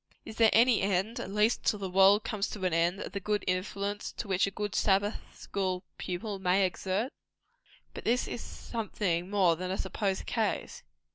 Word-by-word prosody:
Is 220 - -9
there 225 -1 +6
any 235 +1 +5
end, 195 +4 0
at - - -5
least 210 +3 +2
till 210 - +2
the 195 -1 -4
world 195 +3 +5
comes 215 -3 -2
to 195 -3 -4
an 180 - +1
end, 170 +3 +2
of - - -6
the 200 - -3
good 210 +1 -1
influence 200 +2 -2
which 190 -1 +2
a - - -1
good 205 0 -4
Sabbath 205 +2 +2 0.2
school 185 -2 -3 0.2
pupil 195 +3 -4
may 190 +1 +2
thus - - +5
exert? 190 +7 -2 0.8
But - - -8
this 245 +2 +2
is 240 - -5
something 190 -6 -3
more 190 -5 +3
than 180 +2 -5
a 190 - -1
supposed 195 -3 -2
case. - - -2
195 Hz, 190 wpm, -30 LUFS, 185-210 Hz, 0.8 s, there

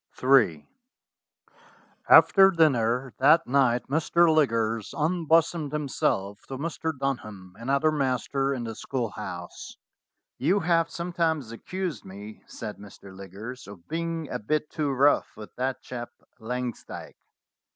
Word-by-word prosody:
in 110 - +4 1.4
AFTER 195 -1 +8
dinner 130 -7 +2
that 155 +5 +5
night 125 -2 +2
Mr. 160 +3 +3
Liggers 115 -7 0
unbosomed 165 -1 +1
him 150 -1 -2
self 100 -5 -1
to 135 - -6
Mr. 160 +2 -3
Dunham, 105 -9 -4
another 140 +6 +1
master, 135 -1 0
in 130 -3 -3
the 115 -1 -5
school 120 -1 -3
house. 90 -5 -8 0.6
"You 180 +9 +2
have 165 0 +2
sometimes 165 -7 -2
accused 185 +7 -5
me," 100 +3 -10
said 105 -2 -7
Mr. 100 -1 -13
Lig 95 -1 -11
gers, 120 +6 -8
"of 100 -4 -13
being 165 -1 -3
a - - -3
bit 150 +8 -2
too 150 -2 -1
rough 140 +2 +2
with 105 - -10
that 130 +1 -2
chap 120 -2 -6 0.3
Langs 125 +1 -4
dyke." - - -9
135 Hz, 130 wpm, -26 LUFS, 110-160 Hz, 1.4 s, AFTER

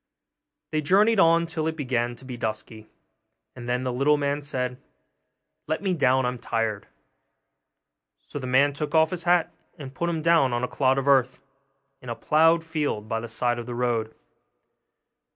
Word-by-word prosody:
They 155 - 0
journeyed 200 +8 +3
on 170 -1 +4
till 160 -1 -3
it 160 - -2
began 120 -4 -1
to 130 - -13
be 130 -1 -6
dusky, 110 -1 -5 0.7
and 120 -1 -8
then 125 +1 0
the 125 -1 -2
little 140 +4 +2
man 145 0 -1
said, 125 -3 -4 0.9
'Let 155 +5 -2
me 195 - 0
get 175 - -2
down, 130 -1 +3
I'm 125 0 -3
tired.' 115 -3 -2 1.4
So 145 - -7
the 130 - -6
man 140 +3 +3
took 150 +2 -4
off 160 0 +4
his 180 -2 -4
hat, 175 -1 +2 0.2
and 135 -4 -9
put 170 +4 -2
him 160 -2 -3
down 165 -6 +3
on 120 +1 -1
a - - +1
clod 130 0 +1
of 135 0 -2
earth, 130 -2 +3 0.6
in 125 - -10
a 120 - -3
ploughed 165 +4 +3
field 150 -10 -3
by 115 0 -2
the 115 - -7
side 120 +1 -1
of 120 - -7
the 120 - -5
road. 120 -2 -1
135 Hz, 185 wpm, -25 LUFS, 120-160 Hz, 1.4 s, on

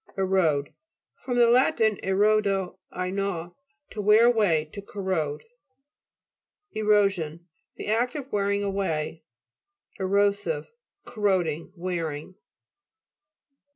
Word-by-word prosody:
ERO'DE 180 -7 +1 0.4
fr. 250 - -6
lat. 245 +5 +4
erodo, 200 -2 +1
I 180 0 -3
gnaw. 190 -3 -3 0.4
To 210 - -4
wear 210 +3 +6
away, 205 -10 +3
to 200 - -6
corrode. 185 -8 -3 1.3
ERO'SION 195 -7 +1 0.3
The - - -7
act 235 +5 0
of 275 -2 -6
wearing 200 0 0
away. 165 -6 -2 0.8
ERO'SIVE 200 - 0 0.3
Corroding, 185 -9 -1
wearing. 170 -2 -4
195 Hz, 85 wpm, -26 LUFS, 175-210 Hz, 1.3 s, wear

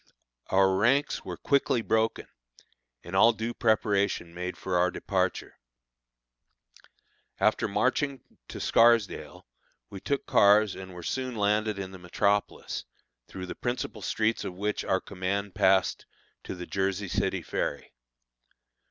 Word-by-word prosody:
Our 95 0 +3
ranks 135 +8 +2
were - - -6
quickly 135 -4 +1
broken, 110 0 0 0.8
and 90 - -7
all 115 +5 +6
due 115 +2 -4
preparation 100 -6 +1
made 90 +1 -5
for 95 -1 -3
our 90 +1 +3
departure. - - -2 1.8
After - - +2
marching 140 -2 0 0.2
to - - -8
Scarsdale 115 -3 +2 0.5
we 100 - -7
took 140 +7 -2
cars 105 0 +5
and 95 -1 -9
were 90 - -8
soon 130 +5 -3
landed 105 0 +1
in 95 -1 -5
the 95 - -10
metropolis, 100 +3 -1 0.4
through 95 -1 -7
the - - -6
principal 120 0 -4
streets 110 +1 0
of 90 - -5
which 105 +3 -2
our 95 - 0
command 100 +1 -3
passed 95 -2 +2 0.4
to - - -5
the 90 -1 -7
Jersey 95 +1 -1
City - - -1
ferry. - - -3
100 Hz, 130 wpm, -28 LUFS, 95-110 Hz, 1.8 s, all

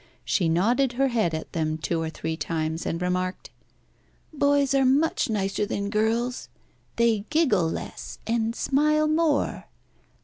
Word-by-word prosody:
She 175 -4 +1
nodded 235 +10 +2
her 270 +2 +1
head 215 -9 0
at 160 - -7
them 155 -2 -1
two 165 +2 -2
or 160 - -2
three 160 0 -4
times, 160 0 -3
and 165 - -2
remarked 180 +1 -2 0.8
"Boys 285 -1 +2
are 270 -1 +3
much 275 +2 +2
nicer 195 -1 -1
than 200 0 -2
girls. 230 +4 0 0.5
They 230 -3 +2
giggle 255 - +2
less, - - -6
and 230 0 0
smile 305 +4 +2
more. 310 -2 +1
220 Hz, 140 wpm, -25 LUFS, 175-275 Hz, 0.8 s, are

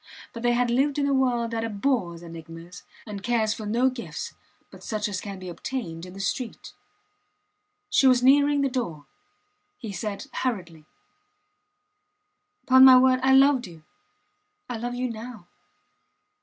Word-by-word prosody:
But 230 - -7
they 240 0 +2
had 240 0 +1
lived 275 +4 +1
in 285 - +1
a 280 - +1
world 245 -3 +1
that 225 -1 -2
abhors 205 -6 -2
enigmas, 165 +1 -11 0.2
and 205 -3 -7
cares 220 -1 +1
for 215 -2 -7
no 240 +5 +2
gifts 250 -2 -7 0.4
but - - -14
such 215 -1 -2
as 195 -3 -4
can 200 -2 -7
be 185 -1 -9
obtained 175 -3 -6
in 180 - -11
the 195 - -10
street. 225 +5 -4 1.1
She 270 - +3
was 250 -1 +4
nearing 285 +2 +4
the 275 - +2
door. 200 - -4 0.7
He 225 -6 -7
said 200 0 -5
hurriedly: 170 -11 -4 1.8
Pon 260 0 +7
my 260 -1 +10
word, 255 0 +4
I 265 0 +3
loved 270 -4 +4
you 165 -3 -14 0.8
I 245 - -4
love 245 +2 -4
you 250 +1 -2
now. 230 -4 -8
235 Hz, 155 wpm, -25 LUFS, 195-255 Hz, 1.8 s, my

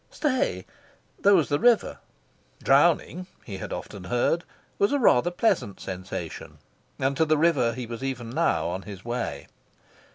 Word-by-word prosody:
Stay! 255 - -1 0.5
there 200 0 +5
was 165 -5 +3
the 145 - +1
river. 240 0 +3 0.6
Drowning 180 0 +3 0.2
(he 100 -4 -6
had - - -7
often 95 +2 -7
heard) 125 - +1 0.4
was 200 - +3
a 285 - +2
rather 175 - +4
pleasant 175 - 0
sensation. 90 -3 -7 0.4
And 135 +1 0
to 160 - +3
the 155 0 +2
river 145 -7 +2
he 125 0 -5
was 115 +2 -7
even 125 -4 -4
now 85 -9 +1
on 90 +2 -3
his 100 -1 -10
way. 120 0 -3
125 Hz, 155 wpm, -26 LUFS, -, 0.6 s, there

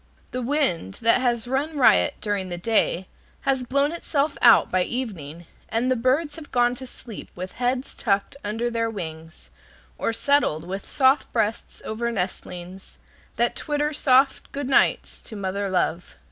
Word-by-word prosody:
The 255 - -3
wind, 235 - 0
that 230 +2 +4
has 240 -2 0
run 285 +4 -1
riot 155 - +5
during 200 -3 -2
the 175 - -4
day, 190 -2 +1 0.3
has 265 -2 +1
blown 280 +4 +1
itself 305 -3 -1
out 235 -2 +6
by 185 - +2
evening, 175 - -4 0.2
and 240 +3 0
the - - +3
birds 275 +6 +1
have 310 -2 -11
gone 245 0 +3
to 260 - -7
sleep 235 -3 -10
with 185 +1 -6
heads 250 +2 -2
tucked 200 -1 0
under 225 +3 -2
their 230 -1 0
wings, 160 -5 -8 0.5
or - - 0
settled 230 - +1
with 195 +2 -6
soft 265 0 +3
breasts 225 -1 -2
over 235 +2 -2
nestlings 185 -2 -5 0.4
that 240 +1 +1
twitter 295 0 -1
soft 270 -1 +3
"good 280 -1 -4
nights" 270 - +2
to 220 - -10
mother 200 0 -2
love. 180 -2 -1
230 Hz, 160 wpm, -24 LUFS, 190-265 Hz, 0.5 s, out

